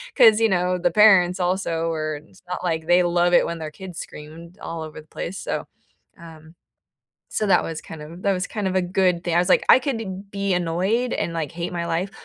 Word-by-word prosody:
'Cause, 225 -5 +7
you 225 - +4
know, 180 -1 +1
the 180 - +1
parents 195 -4 +5
also 175 -2 -1
were 155 -2 -2
it's 190 - -21
not 180 0 -5
like 160 -3 -1
they 175 +1 +5
love 175 0 +2
it - - +5
when 170 - -4
their 155 -1 -6
kids 180 +1 -10
screamed 165 +5 -10
all 165 -1 -6
over 155 -1 -9
the 155 - -23
place, 185 +4 -6
so, - - -3 0.5
um 160 -1 -13 0.8
so 215 - -1
that 195 - +4
was 160 -1 -5
kind 160 -1 -10
of 165 +4 -10
that 200 - +2
was 185 +1 -2
kind 210 -3 -3
of 190 - -2
a 185 - +3
good 180 -1 +1
thing, 175 - -1
I - - +4
was 175 - +2
like, - - +4
"I - - +9
could 205 -7 -4
be 200 -1 -1
annoyed 185 +8 0
and, 170 - -2
like, 160 -3 -3
hate 170 +1 -5
my 170 -1 -3
life, 175 +4 -1
175 Hz, 230 wpm, -23 LUFS, 165-190 Hz, 0.8 s, I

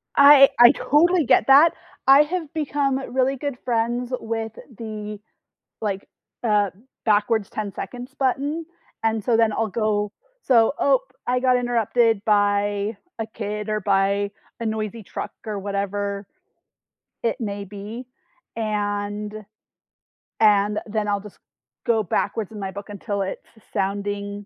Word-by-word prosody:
I 280 -1 +9
I 240 0 +10
totally 335 +3 +3
get 225 - +4
that, 295 +5 +7 0.3
I 275 +2 +9
have 325 -1 -4
become 285 -3 0 0.2
really 265 +1 +2
good 275 -1 -4
friends 240 +1 -1
with 225 -1 -4 0.2
the 215 -2 -6 0.6
like, 200 -2 -3 0.4
uh 210 -3 +2 0.3
backwards 210 0 +2
10 205 -2 -4
seconds 250 +2 -7
button, 285 +5 -1 0.4
and 220 -2 0
so 230 -2 +2
then 225 -1 +4
I'll 225 +1 0
go 210 -1 0 0.3
so, 235 0 +4
oh, 270 -2 +4 0.3
I 250 +1 +2
got 255 -1 +4
interrupted 235 -3 +1
by 205 0 +1 0.2
a 225 - -1
kid 210 0 -4
or 215 -1 -1
by 200 +1 +1 0.3
a 230 - -4
noisy 220 0 -3
truck - - -6
or 210 -2 -3
whatever 200 0 -3 1.0
it 230 +3 -1
may 200 -2 -3
be, 210 +5 -8 0.5
and 205 -1 -2 1.1
and 210 -1 +4
then 215 0 -2
I'll 205 -1 0
just 210 -1 -13 0.5
go 225 -2 +3
backwards 210 +3 -1
in 215 - -8
my 195 -1 -4
book 200 +2 -9
until 205 0 -3
it's 190 - -4 0.2
s 220 - -21
sounding 200 +1 -2
215 Hz, 135 wpm, -23 LUFS, 205-245 Hz, 1.1 s, I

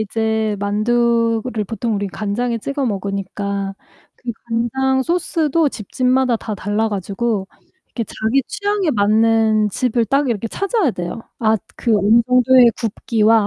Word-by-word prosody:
이제 220 0 -1
만두를 230 +2 +1
보통 225 +2 -2
우리 200 0 -1
간장에 225 +5 -2
찍어 275 +4 -2
먹으니까 200 -1 -3 0.4
그 245 - -5 0.2
간장 265 +3 +1
소스도 330 -2 +1
집집마다 255 +2 0
다 215 -1 -5
달라 205 +3 -1
가지고 200 +1 -2 0.5
이렇게 230 - -2
자기 225 +6 0
취향에 410 -4 -1
맞는 220 -1 +3
집을 235 +2 0
딱 275 +3 +1
이렇게 225 0 -2
찾아야 395 - 0
되요. 180 +2 -5 0.2
아 220 -1 +3 0.2
그 230 -3 +2
어느정도의 240 +4 +5
굽기와 225 -1 +2
225 Hz, 290 characters per minute, -19 LUFS, 210-250 Hz, 0.5 s, 어느정도의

